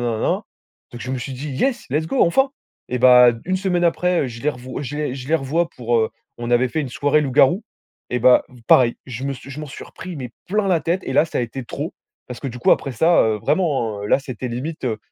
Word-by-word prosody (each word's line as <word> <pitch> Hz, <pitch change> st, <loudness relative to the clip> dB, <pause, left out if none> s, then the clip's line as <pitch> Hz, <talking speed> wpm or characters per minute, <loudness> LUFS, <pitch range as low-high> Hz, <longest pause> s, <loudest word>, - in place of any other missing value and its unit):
nin 120 Hz, -2 st, 0 dB
nin -, -, -3 dB
nin». -, -, 0 dB, 0.5 s
Donc 120 Hz, -, -8 dB
je 130 Hz, -, -5 dB
me 130 Hz, -, -2 dB
suis 130 Hz, +3 st, -5 dB
dit: 140 Hz, +4 st, -6 dB
«Yes, 270 Hz, -, 0 dB
let's 155 Hz, +4 st, 0 dB
go, 265 Hz, -, +2 dB
enfin!» 270 Hz, +11 st, +3 dB, 0.4 s
et 125 Hz, -, -2 dB
bah 125 Hz, -1 st, +8 dB
1 185 Hz, +2 st, 0 dB
semaine 185 Hz, -2 st, 0 dB
après, 180 Hz, +1 st, +2 dB
heu, -, -, -1 dB
je 120 Hz, -1 st, -8 dB
les 150 Hz, -, +2 dB
rev 130 Hz, 0 st, -7 dB
je 145 Hz, +2 st, -5 dB
les 150 Hz, -4 st, -2 dB
je 130 Hz, 0 st, -8 dB
les 160 Hz, -, +2 dB
revois 165 Hz, +4 st, 0 dB
pour, 120 Hz, -1 st, 0 dB
heu, 110 Hz, -1 st, +1 dB, 0.3 s
on 120 Hz, 0 st, -5 dB
avait 120 Hz, +1 st, +3 dB
fait 155 Hz, -, -2 dB
une 140 Hz, -, -3 dB
soirée 145 Hz, +4 st, +2 dB
loup-garou 145 Hz, -, +3 dB, 0.5 s
et 125 Hz, -, 0 dB
bah, 125 Hz, +1 st, +5 dB, 0.2 s
pareil, 120 Hz, -2 st, +5 dB
je 125 Hz, 0 st, -6 dB
me 140 Hz, -, -1 dB
suis 135 Hz, 0 st, -10 dB
je 140 Hz, +2 st, -7 dB
m'en 150 Hz, -, -6 dB
suis 135 Hz, -, -9 dB
repris, 180 Hz, -2 st, -9 dB
mais 125 Hz, -4 st, -6 dB, 0.2 s
plein 210 Hz, +2 st, +1 dB
la 180 Hz, -4 st, +2 dB
tête 170 Hz, +5 st, 0 dB
et -, -, -3 dB
là -, -, +4 dB
ça -, -, -4 dB
a -, -, +2 dB
été 120 Hz, +2 st, -5 dB
trop -, -, -5 dB, 0.3 s
parce 125 Hz, -, -8 dB
que 140 Hz, -, -3 dB
du 125 Hz, 0 st, -8 dB
coup, 120 Hz, -, +5 dB
après 135 Hz, -, 0 dB
ça 165 Hz, +9 st, +4 dB
heu, 110 Hz, -1 st, +1 dB
vraiment, 120 Hz, -, 0 dB
heu 105 Hz, -, -4 dB
là, -, -, +4 dB
c'était 130 Hz, -3 st, -6 dB
limite, 135 Hz, +6 st, -5 dB
heu, 115 Hz, -4 st, -1 dB
135 Hz, 265 wpm, -21 LUFS, 125-165 Hz, 0.5 s, bah